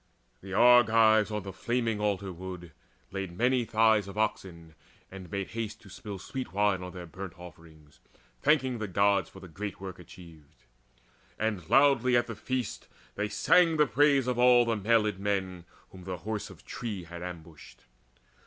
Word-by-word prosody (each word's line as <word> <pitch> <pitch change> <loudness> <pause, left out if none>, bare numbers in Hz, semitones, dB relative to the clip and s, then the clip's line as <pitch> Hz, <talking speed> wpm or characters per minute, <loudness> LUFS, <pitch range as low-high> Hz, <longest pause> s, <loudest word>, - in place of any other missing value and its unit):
The 95 - -10
Argives 115 -2 +5
on 105 -2 -4
the 95 -1 -7
flaming 115 +1 -1
altar 100 -2 -2
wood 90 -1 -8 0.4
Laid 95 -3 -5
many 125 +1 +2
thighs 110 -2 +3
of 100 +1 -9
oxen, 85 -6 -3 0.4
and 95 -2 -10
made 100 +1 -4
haste 110 -2 -5
To - - -14
spill 105 -7 -8
sweet 130 +7 -6
wine 100 -2 +1
on 90 0 -7
their 90 -1 -8
burnt 95 +1 -9
offerings, 80 -3 -15 0.4
Thanking 130 - +2
the 110 - -3
Gods 100 -1 +2
for - - -13
that 90 -4 -13
great 100 +2 -6
work 95 -1 -8
achieved. 80 -4 -15 0.7
And 105 -7 -3
loudly 135 -3 +4
at 120 - +1
the 115 - -7
feast 130 +1 -4 0.3
they 105 0 -3
sang 165 - +3
the 150 - +5
praise 140 +2 +3
Of 125 -1 -1
all 125 -1 +6
the 115 -1 0
mailed 105 -1 +1
men 95 -3 -2 0.3
whom 90 -2 -13
the 95 -1 -4
Horse 105 +5 -5
of - - -15
Tree 105 -7 -5
Had 85 0 -10
ambushed. 85 -3 -10
100 Hz, 170 wpm, -29 LUFS, 90-115 Hz, 0.7 s, all